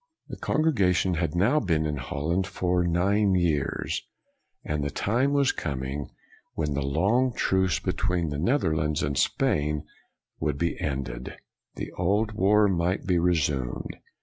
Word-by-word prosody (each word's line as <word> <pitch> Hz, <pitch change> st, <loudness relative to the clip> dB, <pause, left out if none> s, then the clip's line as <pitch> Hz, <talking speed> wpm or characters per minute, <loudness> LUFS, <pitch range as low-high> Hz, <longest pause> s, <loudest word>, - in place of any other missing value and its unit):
The -, -, -6 dB
congregation 95 Hz, -, +2 dB
had 85 Hz, -1 st, -1 dB
now 110 Hz, +12 st, +3 dB
been 80 Hz, -, 0 dB
in 75 Hz, -1 st, -2 dB
Hol 70 Hz, +4 st, -4 dB
land 95 Hz, +2 st, +1 dB
for 90 Hz, -1 st, 0 dB
nine 95 Hz, +3 st, +2 dB
years, 80 Hz, -6 st, 0 dB, 0.6 s
and 75 Hz, -1 st, -2 dB
the 70 Hz, -, -1 dB
time 120 Hz, -, 0 dB
was 140 Hz, -2 st, +3 dB
com 70 Hz, -5 st, -4 dB
ing 70 Hz, +2 st, -4 dB, 0.5 s
when 75 Hz, -2 st, -1 dB
the 70 Hz, -, -1 dB
long 100 Hz, -, +1 dB
truce 95 Hz, -3 st, +1 dB
between 85 Hz, -3 st, -1 dB
the 75 Hz, -, -3 dB
Neth 125 Hz, -, +2 dB
erlands 75 Hz, -3 st, 0 dB
and 70 Hz, 0 st, -1 dB
Spain 75 Hz, +3 st, +1 dB, 0.5 s
would 75 Hz, -2 st, -1 dB
be 85 Hz, +3 st, 0 dB
ended. 65 Hz, -3 st, -4 dB, 0.4 s
The -, -, -5 dB
old 105 Hz, +5 st, 0 dB
war 105 Hz, 0 st, +4 dB
might 90 Hz, -1 st, 0 dB
be 90 Hz, -3 st, +2 dB
resumed. 75 Hz, -7 st, 0 dB
85 Hz, 150 wpm, -26 LUFS, 75-95 Hz, 0.6 s, war